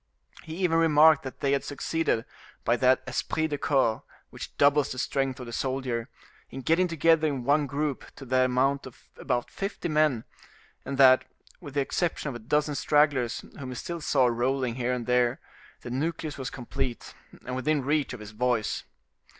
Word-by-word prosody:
He 160 Hz, -, -8 dB
even 175 Hz, -3 st, +2 dB
remarked 155 Hz, -1 st, +6 dB
that 130 Hz, -, -9 dB
they 140 Hz, -, +1 dB
had 140 Hz, -, +1 dB
succeeded, 145 Hz, -4 st, -1 dB, 0.4 s
by 120 Hz, -, +3 dB
that 130 Hz, 0 st, +3 dB
esprit 160 Hz, -, -1 dB
de 145 Hz, -1 st, -3 dB
corps 130 Hz, -7 st, +1 dB, 0.3 s
which -, -, -9 dB
doubles 145 Hz, 0 st, +4 dB
the 130 Hz, -, -5 dB
strength 135 Hz, +1 st, -1 dB
of 125 Hz, -, -6 dB
the 120 Hz, -, -8 dB
soldier, 130 Hz, -2 st, -2 dB, 0.4 s
in 135 Hz, -, -7 dB
getting 165 Hz, +6 st, +2 dB
together 165 Hz, -1 st, +3 dB
in 135 Hz, -4 st, -2 dB
one 145 Hz, +3 st, +2 dB
group 145 Hz, 0 st, -2 dB
to 135 Hz, -, -10 dB
the 130 Hz, 0 st, +3 dB
amount 130 Hz, +2 st, +1 dB
of 125 Hz, -, -17 dB
about 120 Hz, -, -2 dB
fifty 195 Hz, -2 st, -4 dB
men; 150 Hz, -7 st, +2 dB, 0.6 s
and 140 Hz, -, -4 dB
that, 130 Hz, -1 st, +6 dB, 0.3 s
with 145 Hz, -6 st, -10 dB
the 140 Hz, -, +3 dB
exception 155 Hz, +1 st, -1 dB
of -, -, -5 dB
a -, -, -6 dB
dozen 150 Hz, +6 st, 0 dB
stragglers 145 Hz, -5 st, +1 dB
whom 130 Hz, -2 st, -6 dB
he 125 Hz, -, -6 dB
still 170 Hz, +6 st, -5 dB
saw 135 Hz, -3 st, +3 dB
rolling 125 Hz, +1 st, 0 dB
here 125 Hz, 0 st, -1 dB
and 125 Hz, -2 st, -2 dB
there, 125 Hz, 0 st, +2 dB, 0.4 s
the 120 Hz, -, -7 dB
nucleus 155 Hz, +2 st, -2 dB
was 135 Hz, -1 st, -5 dB
complete, 130 Hz, 0 st, -5 dB, 0.3 s
and 125 Hz, -, -4 dB
within 140 Hz, +1 st, 0 dB
reach 145 Hz, -1 st, +1 dB
of 125 Hz, -, -7 dB
his 105 Hz, 0 st, -9 dB
voice. 115 Hz, 0 st, -1 dB
135 Hz, 185 wpm, -27 LUFS, 125-150 Hz, 0.6 s, remarked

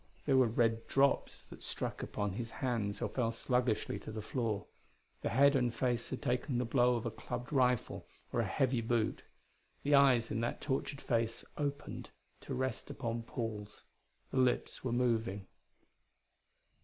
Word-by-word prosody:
There 140 Hz, -, +3 dB
were 130 Hz, -2 st, +6 dB
red 115 Hz, 0 st, +1 dB
drops 140 Hz, +1 st, +2 dB
that -, -, -13 dB
struck -, -, -3 dB
upon 105 Hz, -2 st, -2 dB
his 115 Hz, +3 st, -4 dB
hands 110 Hz, -5 st, -2 dB
or -, -, +2 dB
fell 115 Hz, -3 st, 0 dB
sluggishly 120 Hz, -1 st, 0 dB
to -, -, -8 dB
the 110 Hz, -, -4 dB
floor; 110 Hz, -6 st, -1 dB, 0.6 s
the -, -, -1 dB
head 140 Hz, +3 st, +5 dB
and 125 Hz, -3 st, +2 dB
face 120 Hz, 0 st, -1 dB
had 130 Hz, -, -5 dB
taken 125 Hz, +1 st, 0 dB
the 125 Hz, -, +1 dB
blow 125 Hz, +1 st, +4 dB
of 115 Hz, -, -3 dB
a 115 Hz, -, -1 dB
clubbed 125 Hz, +4 st, -5 dB
rifle 125 Hz, -3 st, +1 dB, 0.3 s
or -, -, +1 dB
a -, -, +2 dB
heavy 130 Hz, -2 st, +1 dB
boot. 115 Hz, -1 st, 0 dB, 0.6 s
The 145 Hz, -, +2 dB
eyes 130 Hz, -5 st, +5 dB
in 115 Hz, -, 0 dB
that 120 Hz, -, -1 dB
tortured 140 Hz, 0 st, -2 dB
face 115 Hz, -1 st, 0 dB
opened 145 Hz, -1 st, -3 dB, 0.3 s
to -, -, -5 dB
rest 130 Hz, -2 st, -2 dB
upon 115 Hz, -1 st, -3 dB
Paul's, 110 Hz, -3 st, -5 dB, 0.5 s
the -, -, -2 dB
lips 125 Hz, -1 st, +1 dB
were 130 Hz, -, -1 dB
moving. 115 Hz, -5 st, +1 dB
120 Hz, 165 wpm, -34 LUFS, 115-130 Hz, 0.6 s, were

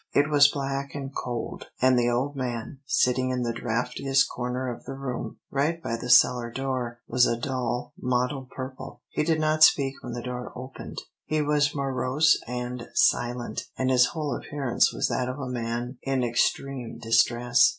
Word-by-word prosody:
It 145 Hz, +2 st, +3 dB
was 145 Hz, -1 st, +7 dB
black 140 Hz, 0 st, -3 dB
and 140 Hz, -1 st, -5 dB
cold, 120 Hz, -2 st, -4 dB
and 130 Hz, 0 st, +5 dB
the 120 Hz, -1 st, +3 dB
old 130 Hz, +4 st, 0 dB
man, 125 Hz, +1 st, -4 dB
sitting 130 Hz, -1 st, +2 dB
in 125 Hz, -1 st, -1 dB
the 120 Hz, -1 st, -1 dB
draughtiest 125 Hz, +4 st, +1 dB
corner 125 Hz, +1 st, -3 dB
of 120 Hz, -2 st, -6 dB
the 135 Hz, -, -6 dB
room, 125 Hz, -4 st, -5 dB
right 150 Hz, +5 st, 0 dB
by 115 Hz, -, -3 dB
the 125 Hz, +2 st, -6 dB
cellar 120 Hz, -1 st, +5 dB
door, 125 Hz, -2 st, -3 dB
was 125 Hz, +1 st, +4 dB
a 115 Hz, -, 0 dB
dull, 125 Hz, -1 st, -3 dB
mottled 125 Hz, +1 st, -1 dB
purple. 130 Hz, 0 st, -8 dB
He -, -, -1 dB
did 160 Hz, +1 st, +1 dB
not 155 Hz, 0 st, +3 dB
speak 135 Hz, -3 st, +5 dB
when 120 Hz, -, -6 dB
the 120 Hz, 0 st, -5 dB
door 125 Hz, 0 st, -5 dB
opened. 130 Hz, +1 st, -8 dB, 0.3 s
He 155 Hz, -1 st, 0 dB
was 145 Hz, 0 st, +2 dB
morose 140 Hz, +3 st, +2 dB
and 125 Hz, 0 st, -4 dB
silent, 120 Hz, -2 st, +1 dB
and 130 Hz, 0 st, +1 dB
his 125 Hz, -1 st, +5 dB
whole 155 Hz, -3 st, -3 dB
appearance 140 Hz, -4 st, +1 dB
was -, -, 0 dB
that 125 Hz, 0 st, -1 dB
of 130 Hz, -, -4 dB
a 140 Hz, -, -4 dB
man 120 Hz, +1 st, -3 dB
in 135 Hz, -2 st, 0 dB
extreme 125 Hz, +1 st, -1 dB
distress. 120 Hz, +1 st, +4 dB
130 Hz, 175 wpm, -26 LUFS, 120-135 Hz, 0.3 s, was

